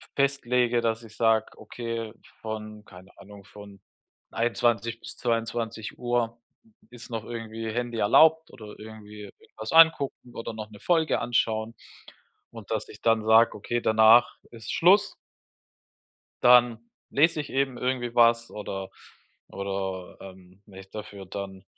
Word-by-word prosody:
festlege, 125 -3 +1
dass 115 0 -1
ich 110 -1 -14
sage: 110 -1 +2
„Okay, 115 0 -6 0.3
von 110 -1 -7
keine 95 -1 -16
Ahnung 100 0 -14
von 100 -1 -14 0.5
21:00 115 0 0
bis - - -10
22:00 115 0 -2 0.5
ist 120 0 -12
noch 115 -1 -4
irgendwie 115 -1 -6
Handy 120 0 -3
erlaubt 160 +10 +4
oder 105 -4 -12
irgendwie 105 -1 -11 0.2
irgendwas 110 0 -9
angucken 160 -6 +4
oder 115 0 -6
noch 110 -1 -8
'ne 105 - -13
Folge 165 - +1
anschauen 115 -2 -1 0.8
und 115 -4 -12
dass 110 -1 -2
ich 105 - -13
dann 115 -1 +2
sage 110 +1 +5
okay, 120 +3 -3
danach 110 +2 +5
ist 115 -2 -8
Schluss.“ 200 +4 +4 1.3
Dann 120 -2 +5 0.3
lese 160 +2 +2
ich 145 - -10
eben 135 -2 -1
irgendwie 125 -1 -2
was 115 0 +3
oder 95 -2 -6 0.6
oder, 95 -2 -5
ähm, 95 0 -14
wenn 95 -3 -14
ich 95 0 -14
dafür 105 -2 -9
dann 95 -1 -7
115 Hz, 130 wpm, -26 LUFS, 105-120 Hz, 1.3 s, sage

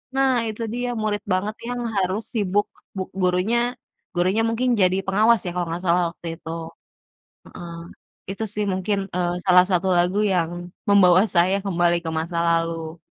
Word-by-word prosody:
nah, 270 -1 +3
itu 220 +1 -4
dia. 245 +1 -2
Murid 210 -1 -1
banget 205 +3 -1
yang 245 0 -3 0.2
harus 190 +4 -1
sibuk, 205 -2 +1 0.3
bu 190 - -1 0.2
gurunya, 180 +6 +2 0.6
gurunya 185 +5 +2
mungkin 245 +3 0
jadi 185 0 +3
pengawas, 215 +4 +4
ya, 175 - -2
kalau 175 -1 -1
nggak 175 +2 -4
salah, 175 +1 +3
waktu 170 +1 -11
itu. 160 - -9 1.0
Heeh. 170 -1 -9 0.6
Itu 200 +3 -4
sih, 210 - 0
mungkin, 190 +2 -1 0.2
eee, 175 -1 0
salah 180 -1 +6
satu 185 +1 +1
lagu 180 +4 +2
yang 170 -2 +1 0.4
membawa 185 -2 +6
saya 185 +3 +4
kembali 175 -2 +2
ke - - -1
masa 170 +1 -4
lalu. 165 -1 -1
185 Hz, 160 wpm, -23 LUFS, 175-210 Hz, 1.0 s, salah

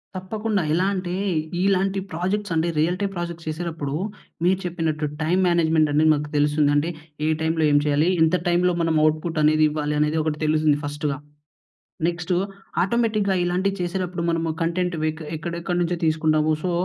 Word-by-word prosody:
తప్పకుండా. 210 +2 -2
ఎలా 180 +3 +2
అంటే, 180 -2 -3 0.5
ఇలాంటి 195 0 +2
ప్రాజెక్ట్స్ 190 +4 -2
అంటే, 160 +1 +1
రియల్టీ 180 +6 +1
ప్రాజెక్ట్స్ 170 -2 -5
చేసేటప్పుడు, 155 -3 -4 0.5
మీరు 185 +1 +3
చెప్పినట్టు 160 -3 -1 0.2
టైమ్ 175 +4 +2
మేనేజ్మెంట్ 160 -2 +3
అనేది 155 +2 +4
మనకు 150 0 -3
తెలుస్తుంది. 145 0 +3
అంటే, 145 +3 +1 0.4
ఏ - - +2
టైమ్‌లో 160 0 +1
ఏం 145 - +5
చేయాలి? 150 +3 +2
ఎంత 160 +2 +4
టైమ్‌లో 175 +1 +3
మనం 165 -1 +1
ఔట్‌పుట్‌ 155 +1 0
అనేది 155 +1 +4
ఇవ్వాలి? 150 0 -2
అనేది 150 +1 +1
ఒకటి 150 -1 -2
తెలుస్తుంది 155 -1 +3
ఫస్ట్‌గా. 145 -1 -2 0.9
నెక్స్ట్ 175 +1 -3 0.5
ఆటోమేటిక్‌గా 215 -1 +1
ఇలాంటివి 185 +3 0
చేసేటప్పుడు, 180 0 -2
మనము 165 0 0
కంటెంట్ 175 +1 0
వె 155 - +2 0.3
ఎక్కడెక్కడి 170 +2 -3
నుంచో 175 +1 -1
తీసుకుంటాము. 155 0 +2
సో, 185 - -1
165 Hz, 150 wpm, -23 LUFS, 155-180 Hz, 0.9 s, ఏం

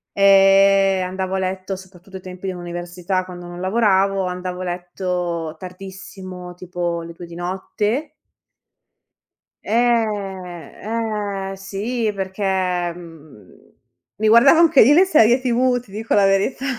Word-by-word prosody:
eh 195 -1 +5
andavo 190 +1 -3
a - - 0
letto, 190 +1 -3
soprattutto 190 0 -12
ai - - -12
tempi 185 +1 -8
dell'università, 175 +1 -4
quando 175 -1 -10
non 175 0 -9
lavoravo, 195 -1 +2
andavo 180 0 -5
a - - -4
letto 175 -2 -3
tardissimo 185 0 -9
tipo 175 -1 -4
le 170 0 -9
2 175 - -10
di 170 0 -11
notte. 210 - -3 1.5
Eh, 210 -2 -2
eh, - - -5
sì, 210 +4 -3
perché, 190 -2 -1
mhmm, 155 - -15 0.4
mi 215 +3 0
guardavo 240 +8 +7
anche 330 -4 +5
io 265 +7 +6
le 350 +5 +6
serie 245 -7 +4
TV, 250 0 +1
ti 225 -5 -20
dico 220 +2 -3
la 200 -1 +5
verità. 195 +7 +1
190 Hz, 130 wpm, -20 LUFS, 180-210 Hz, 1.5 s, guardavo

